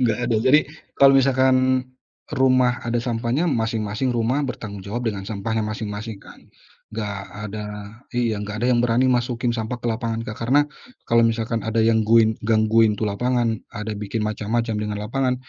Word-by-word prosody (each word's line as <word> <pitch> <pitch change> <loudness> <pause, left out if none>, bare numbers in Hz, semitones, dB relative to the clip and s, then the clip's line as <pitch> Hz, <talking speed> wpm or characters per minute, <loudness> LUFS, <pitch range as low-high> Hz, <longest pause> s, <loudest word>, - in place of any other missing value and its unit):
nggak 115 -3 +2
ada. 115 - +3
Jadi, 130 +7 +5 0.4
kalau 135 0 +6
misalkan 130 -1 +3 0.7
rumah 130 -3 +3
ada 120 0 0
sampahnya, 120 +7 0
masing-masing 110 0 -1
rumah 120 +3 +1
bertanggung 110 -5 -6
jawab 120 +5 -3
dengan 95 -2 -7
sampahnya 110 +1 -2
masing-masing 105 -1 -5
kan? - - -14 0.6
Nggak 105 -2 -3 0.3
ada 105 +1 -5 0.5
iya, 115 -3 0
nggak 105 +2 -5
ada - - +2
yang 120 - +3
berani 120 +2 +2
masukin 120 0 0
sampah 115 +1 -4
ke - - -3
lapangan, 115 0 -2
Kak. 110 -1 -7
Karena 135 +4 +5 0.5
kalau 115 0 +5
misalkan 115 0 -1
ada 110 0 +1
yang 110 -1 +3
guin 110 -1 +4
gangguin 110 0 +4
tuh 105 +1 -2
lapangan, 120 +1 0 0.2
ada 105 +1 -4
bikin 105 +2 -3
macam-macam 110 +2 -1
dengan 105 0 -3
lapangan, 130 +3 0
115 Hz, 165 wpm, -22 LUFS, 110-125 Hz, 0.7 s, kalau